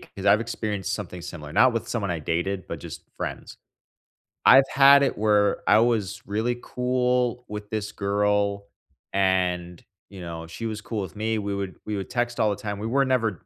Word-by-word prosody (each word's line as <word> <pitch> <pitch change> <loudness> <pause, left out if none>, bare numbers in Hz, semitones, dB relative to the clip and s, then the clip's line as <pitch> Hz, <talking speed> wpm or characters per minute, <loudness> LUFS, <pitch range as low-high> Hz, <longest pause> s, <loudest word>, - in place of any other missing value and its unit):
'cause 100 0 -9
I've 100 +2 +6
experienced 105 -4 -3
something 90 -1 -5
similar, 75 -3 -8
not 130 +6 +5
with 115 - -3
someone 100 -5 -2
I 85 - -1
dated, 85 +5 -2
but - - -6
just - - -9
friends. - - -6 0.9
I've 135 +1 +8
had 140 +1 +7
it 135 - 0
where 105 -1 +2
I - - +7
was 115 -4 0
really 110 +4 -1
cool 125 -1 0
with 105 0 -7
this 105 -2 -3
girl, 100 0 0 0.5
and, 90 -2 0 0.3
you 95 -2 -10
know, 85 -1 -7
she 100 +7 -7
was 110 -1 -3
cool 110 0 -4
with 95 -5 -7
me. 110 +1 -1
We 100 -1 -3
would 100 -2 -4
we 105 -1 -3
would 95 - -5
text 120 -1 -2
all 110 - +3
the 100 - 0
time. 100 0 -5
We 110 - -3
were 135 +4 +2
never 115 - 0
105 Hz, 190 wpm, -25 LUFS, 95-115 Hz, 0.9 s, I've